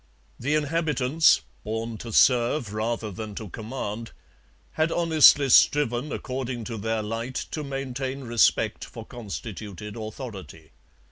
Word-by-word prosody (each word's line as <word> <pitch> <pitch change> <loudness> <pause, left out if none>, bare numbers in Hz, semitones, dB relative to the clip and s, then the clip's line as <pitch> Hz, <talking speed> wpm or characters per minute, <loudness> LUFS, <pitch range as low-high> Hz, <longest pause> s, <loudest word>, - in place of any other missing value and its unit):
The 145 +5 0
inhabitants, 155 -1 +3 0.2
born 110 +1 -3
to 115 - -7
serve 120 -1 +3
rather 110 0 -2
than 105 +1 -7
to 110 -2 -6
command, 115 +1 -6 0.6
had 160 +1 0
honestly 155 -4 +6
striven 135 +1 +4
according 130 -2 -4
to 115 0 -5
their 110 +1 -1
light 115 +4 -4 0.2
to 155 - -3
maintain 135 -1 -4
respect 120 -2 +2
for - - -9
constituted 105 -2 -7
authority. 110 - -8
120 Hz, 120 wpm, -26 LUFS, 110-135 Hz, 0.6 s, honestly